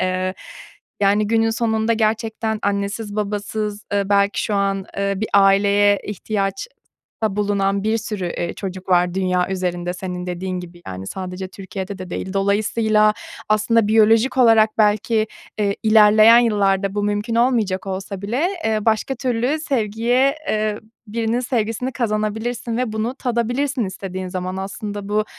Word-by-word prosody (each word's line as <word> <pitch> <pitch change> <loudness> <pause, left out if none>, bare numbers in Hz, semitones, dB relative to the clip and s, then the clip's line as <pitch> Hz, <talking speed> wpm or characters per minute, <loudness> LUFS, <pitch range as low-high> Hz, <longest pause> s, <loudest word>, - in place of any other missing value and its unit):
Eee, 185 0 -1 0.7
yani, 205 +1 +3
günün 225 +1 +2
sonunda 225 0 0
gerçekten 220 0 -1
annesiz, 205 +1 -2
babasız, 210 0 -3
eee, 200 -1 0
belki 200 0 +2
şu 210 - -1
an, 195 -1 0
eee, 200 0 0
bir 215 +3 -3
aileye 200 +1 +4
ihtiyaçta 200 - -3 0.6
bulunan 200 -1 0
bir 220 +1 +1
sürü, 210 -4 -4
eee, 170 0 -3
çocuk 185 -1 -7
var 180 -1 +3
dünya 185 -1 0
üzerinde 180 -2 -2
senin 180 -1 -5
dediğin 180 +1 -3
gibi, 175 0 -12
yani, 95 0 -6
sadece 185 - -5
Türkiye'de 190 +1 -7
de 185 -1 -8
değil. 190 - -4
Dolayısıyla 215 +2 +2 0.3
aslında 215 +1 +2
biyolojik 225 +4 +4
olarak 225 -3 +6
belki, 215 +1 +2 0.3
eee, 200 -1 0
ilerleyen 215 +1 +7
yıllarda 200 -4 +2
bu 205 - -1
mümkün 205 +2 -1
olmayacak 230 -6 +1
olsa 190 0 -5
bile, 245 - 0 0.2
eee, 220 -1 +1
başka 225 +4 +1
türlü 255 +3 -1
sevgiye 245 0 +1
eee, 215 -1 0 0.3
birinin 225 +2 -1
sevgisini 240 0 -2
kazanabilirsin 225 +1 -2
ve 245 -3 -1
bunu 220 +3 -2
tadabilirsin 245 +1 -1
istediğin 185 -1 -5
zaman 185 0 -4
aslında 200 +1 -5
bu 210 +1 +1
210 Hz, 140 wpm, -20 LUFS, 195-225 Hz, 0.7 s, ilerleyen